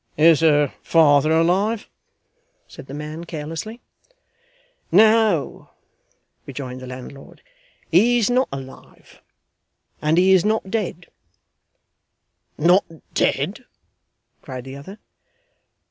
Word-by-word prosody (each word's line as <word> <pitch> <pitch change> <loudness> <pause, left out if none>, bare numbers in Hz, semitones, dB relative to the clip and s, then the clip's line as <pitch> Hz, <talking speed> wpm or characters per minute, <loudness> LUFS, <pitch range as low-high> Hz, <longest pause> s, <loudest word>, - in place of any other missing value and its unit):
'Is 160 0 +5
her 150 -3 +3
father 155 -2 +4
alive?' 185 +7 +1 0.8
said - - -13
the 135 - -9
man, 155 +2 -7
carelessly. 165 +8 -7 1.1
'No,' 215 -3 +3 0.8
rejoined 130 -2 -7
the 130 - -10
landlord, 130 +2 -11 0.5
'he 225 +9 +4
is 230 - +2
not 250 +2 +1
alive, 135 -1 -11 0.8
and 155 +2 +1
he 185 +2 +4
is 185 -2 +4
not 215 -2 -1
dead 185 -5 -3 0.8
' - - -52
'Not 175 +5 +4 0.3
dead!' - - -1 0.8
cried 130 -1 -8
the 135 +1 -9
other. 165 +9 -11
165 Hz, 100 wpm, -21 LUFS, 145-200 Hz, 1.1 s, Is